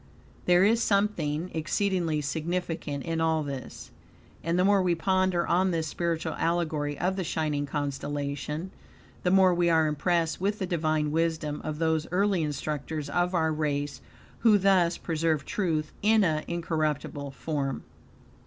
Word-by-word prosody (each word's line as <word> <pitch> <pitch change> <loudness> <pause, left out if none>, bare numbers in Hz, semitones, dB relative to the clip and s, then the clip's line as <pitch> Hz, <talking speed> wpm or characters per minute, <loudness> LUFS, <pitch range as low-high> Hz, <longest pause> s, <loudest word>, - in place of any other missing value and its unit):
There 180 +1 +5
is 225 +3 +4
something 180 -6 0
exceedingly 165 -1 0
significant 160 -1 -3
in 165 -1 -2
all 160 -1 +2
this, 135 -3 -7 0.5
and 170 +2 0
the 180 - +3
more 200 -1 +4
we 180 -2 +2
ponder 185 0 +1
on 185 +2 +3
this 165 -3 -1
spiritual 165 +1 -2
allegory 155 -4 0
of 185 +2 -1
the 190 - -1
shining 150 -3 -1
constellation, 145 +3 -3 0.5
the 180 - +1
more 190 -1 +5
we 175 0 +2
are 160 -1 +4
impressed 165 +2 0
with 205 +2 0
the 190 - -2
divine 155 -3 0
wisdom 160 -2 -1
of 155 -1 -4
those 160 -1 0
early 195 -1 +2
instructors 150 0 -3
of 175 +1 +1
our 160 -2 +2
race, 145 -2 -2 0.4
who 220 -3 +5
thus 185 -3 +3
preserved 160 -2 -1
truth 160 -6 -1
in 215 +1 +4
an 155 -4 0
incorruptible 155 -4 -2
form. 140 -1 -3
165 Hz, 145 wpm, -28 LUFS, 150-180 Hz, 0.5 s, There